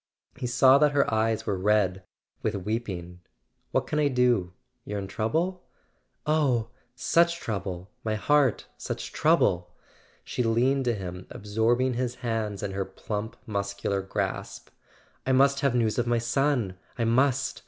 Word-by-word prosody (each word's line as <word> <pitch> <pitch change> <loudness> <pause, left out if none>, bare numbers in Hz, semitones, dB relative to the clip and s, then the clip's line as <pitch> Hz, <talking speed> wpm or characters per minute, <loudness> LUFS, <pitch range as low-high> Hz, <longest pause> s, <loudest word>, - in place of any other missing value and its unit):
He 125 -1 -4
saw 130 +2 +6
that 150 -1 +4
her 140 -5 +2
eyes 110 0 +1
were 100 -3 -1
red 95 -2 +2 0.4
with 110 -1 -1
weeping. 95 -4 -4 0.5
"What - - +1
can 150 - -1
I 150 - +4
do? 125 -8 +2 0.3
You're 105 - -4
in 100 - -3
trouble?" 160 - -1 0.6
"Oh, 140 -7 +2 0.3
such 170 +6 +2
trouble, 95 - -4
my 110 -1 -1
heart—such 140 +2 0
trouble!" 90 0 +2 0.5
She - - -3
leaned 125 +4 +2
to 120 -2 +1
him, 90 -2 -7
absorbing 115 +5 +1
his 125 0 -2
hands 110 -5 -3
in 100 - -2
her 95 0 -1
plump 105 +3 -5
mus¬ 100 -1 -3
cular 100 -1 0
grasp. 95 - -4 0.6
"I 130 - +3
must 140 +1 +4
have 140 -3 +1
news 115 -1 +1
of 120 - 0
my 120 0 +2
son; 120 -5 0 0.2
I 120 - 0
must! 130 +3 +2
115 Hz, 150 wpm, -27 LUFS, 100-130 Hz, 0.6 s, saw